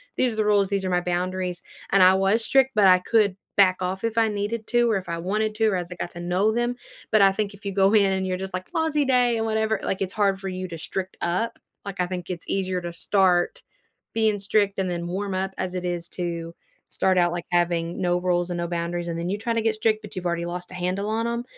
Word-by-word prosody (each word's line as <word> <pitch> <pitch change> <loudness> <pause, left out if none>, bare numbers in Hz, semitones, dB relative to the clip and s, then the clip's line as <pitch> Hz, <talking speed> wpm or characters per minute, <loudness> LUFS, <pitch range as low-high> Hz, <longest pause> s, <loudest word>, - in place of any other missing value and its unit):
these 250 -2 +1
are - - -6
the 215 -1 0
rules. 205 -2 +3
These 200 -2 -1
are - - -1
my 180 0 +2
boundaries," 180 0 -2 0.3
and 195 -1 +6
I 185 +1 +8
was 195 +4 +2
strict, 265 +1 +4
but 205 -2 +6
I 185 0 +7
could 205 0 +2 0.2
back 185 -2 +4
off 185 +2 -3
if 230 0 0
I 225 - +4
needed 210 +2 -3
to, 240 -1 +3
or 215 - +2
if 190 - -7
I 170 - -2
wanted 210 +5 -1
to, 220 +1 +1
or 200 - 0
as 175 -1 -5
I - - -5
got 175 - -5
to 175 - -9
know 180 +5 +1
them, 240 +1 0 0.4
but 215 -2 +5
I 195 - +6
think 200 +1 -3
if 200 - -19
you 200 - -1
go 195 0 +4
in 205 -2 +6
and 190 0 -1
you're 185 0 -1
just 190 0 -6
like, 185 0 -4
"Lousy 315 -2 +1
day," 250 -3 +3
and 225 - -1
whatever, 220 0 0
like, 190 - -2
it's 190 0 -5
hard 200 -2 +1
for 195 - -6
you 185 0 -4
to 170 -2 -7
strict 190 +4 -5
up. 185 +7 -1 0.3
Like, 200 -1 -7
I 180 - +2
think 180 -1 -6
it's 175 -2 -6
easier 185 -2 -1
to 175 -1 -6
start 180 0 +2 0.5
being 220 -2 +2
strict 200 0 +1
and 190 -1 0
then 170 0 -3
warm 195 +2 -3
up, 190 +1 -2
as 185 -1 -3
it 180 0 -3
is 175 -1 -3
to 170 -2 -4 0.4
start 190 -1 +2
out, 175 -1 +3
like, 175 -1 -4
having 175 -1 0
no 175 0 +1
rules 180 0 0
and 175 - -2
no 170 - -2
boundaries 170 0 -3
and 170 -1 -3
then 170 - -3
you 200 - -1
try 230 +2 -1
to 230 - +1
get 220 0 +1
strict, 215 0 +1
but 210 - -10
you've 185 -1 -5
already 170 0 -1
lost 175 +1 -5
a - - -9
handle 185 +3 -2
on 225 +1 0
'em. 235 0 -2
190 Hz, 270 wpm, -24 LUFS, 180-215 Hz, 0.5 s, I